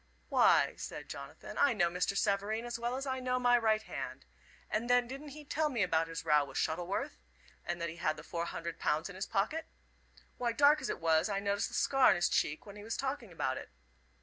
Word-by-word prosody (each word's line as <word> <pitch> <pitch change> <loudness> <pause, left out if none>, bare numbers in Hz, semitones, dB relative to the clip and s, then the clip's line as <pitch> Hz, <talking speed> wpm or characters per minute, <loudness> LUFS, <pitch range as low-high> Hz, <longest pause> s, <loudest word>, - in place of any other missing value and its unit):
"Why," - - +5
said - - -7
Jonathan, - - -8
"I 285 -3 +5
know 175 -5 +2
Mr. 180 +3 0
Savareen 205 +4 0
as 240 0 -4
well 240 +1 -1
as 270 +1 -3
I 260 -1 -2
know 255 0 0
my 245 -1 +4
right 220 -2 +2
hand. - - -6 0.4
And 230 +3 -2
then, 245 -1 +4
didn't 275 +4 -7
he 295 +1 -10
tell 305 +1 0
me 240 -7 +1
about 165 -3 +1
his 165 0 -6
row 150 -2 +5
with 135 -1 -7
Shuttleworth, 180 - -2 0.4
and 175 0 -3
that 170 0 -2
he 165 - -9
had 155 -2 0
the 150 - -9
four 170 +1 -3
hundred 170 0 -5
pounds 155 +5 0
in 200 - -9
his 190 +1 -4
pocket. 265 +11 -1 0.7
Why, 240 -2 0
dark 290 +4 +5
as - - -3
it - - -2
was, 165 +3 +3
I 200 -1 0
noticed 200 0 0
the - - -8
scar 270 -1 +4
on - - +5
his 175 - +2
cheek 155 +1 0
when 205 0 -10
he 205 - -9
was 220 +1 -3
talking 265 -6 -3
about 135 -5 -1
it. - - -8
205 Hz, 230 wpm, -33 LUFS, 170-250 Hz, 0.7 s, Why